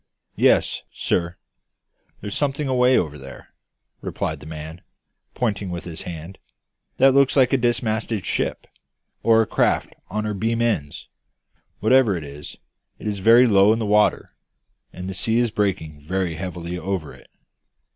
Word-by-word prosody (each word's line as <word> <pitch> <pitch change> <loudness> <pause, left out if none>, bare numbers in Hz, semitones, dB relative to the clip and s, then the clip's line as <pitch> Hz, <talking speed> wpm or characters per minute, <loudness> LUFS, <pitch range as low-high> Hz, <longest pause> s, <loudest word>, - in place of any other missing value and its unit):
"Yes, - - +3
sir. 85 +1 -1 0.8
There's 105 -1 -5
something 145 0 -1
away 125 0 +4
over 75 -3 -2
there," 65 0 -12 0.5
replied - - -3
the 75 - -12
man, 80 +2 -8 0.5
pointing 105 -5 -1
with 85 -1 -5
his 85 -2 -7
hand, 85 +2 -8 0.6
"that 135 0 +5
looks 140 +1 +4
like 130 0 +4
a - - +5
dismasted 115 -3 -1
ship, - - -2 0.6
or 115 -1 +5
a - - -4
craft - - 0 0.2
on 105 +3 -2
her 105 - -2
beam 115 +3 -1
ends. 105 -12 -1 0.7
Whatever 115 -2 +4
it 80 - -6
is, 70 0 -10 0.4
it - - -12
is 105 -2 -2
very 115 +5 +6
low 100 -2 +5
in - - -1
the 115 - -2
water; 105 0 +2 0.6
and 90 +1 -7
the 95 - -4
sea 110 +5 0
is 120 -2 +2
breaking 90 -8 -2
very 90 +1 -2
heavily 90 +1 -5
over 95 -5 -4
it." - - -18
100 Hz, 155 wpm, -22 LUFS, 85-115 Hz, 0.8 s, very